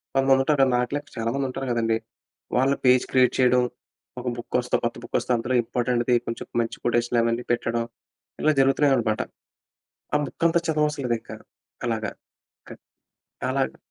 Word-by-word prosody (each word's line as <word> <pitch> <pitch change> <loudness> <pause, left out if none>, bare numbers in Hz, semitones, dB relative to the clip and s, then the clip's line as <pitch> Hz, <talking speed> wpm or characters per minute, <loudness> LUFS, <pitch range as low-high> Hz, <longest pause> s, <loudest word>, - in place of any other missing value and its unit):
కొంతమంది 135 0 +4
ఉంటారు. 140 -1 +3
నాకులా 125 +4 0 0.2
చాలామంది 120 +4 -1
ఉంటారు 135 +1 -4
గదండీ! 115 -1 +1 0.6
వాళ్ళు 135 +2 +3
పేజ్ 125 0 +6
క్రియేట్ 130 -1 +4
చేయడం 125 -1 +4 0.6
ఒక 125 - -6
బుక్కొస్తే 125 +1 -1
కొత్త 120 0 -1
బుక్కొస్తే - - -2
అందులో 120 +2 -1
ఇంపార్టెంట్‌ది 120 +1 +1
కొంచెం 115 - -5
మంచి 115 - -4
కొటేషన్‌లు 120 0 +2
అవన్నీ 115 +1 0
పెట్టడం 120 -1 0 0.6
ఇలా 155 - +4
జరుగుతున్నాయి 135 +1 +4
అన్నమాట. 110 -3 0 0.9
ఆ - - +6
బుక్కంతా 170 +5 +1
చదవవసరం 150 -3 0
లేదింకా 115 -1 -3 0.5
అలాగా. 110 -3 -1 0.6
క - - -13 0.8
అలాగా 135 +1 -1
125 Hz, 135 wpm, -25 LUFS, 120-135 Hz, 0.9 s, పేజ్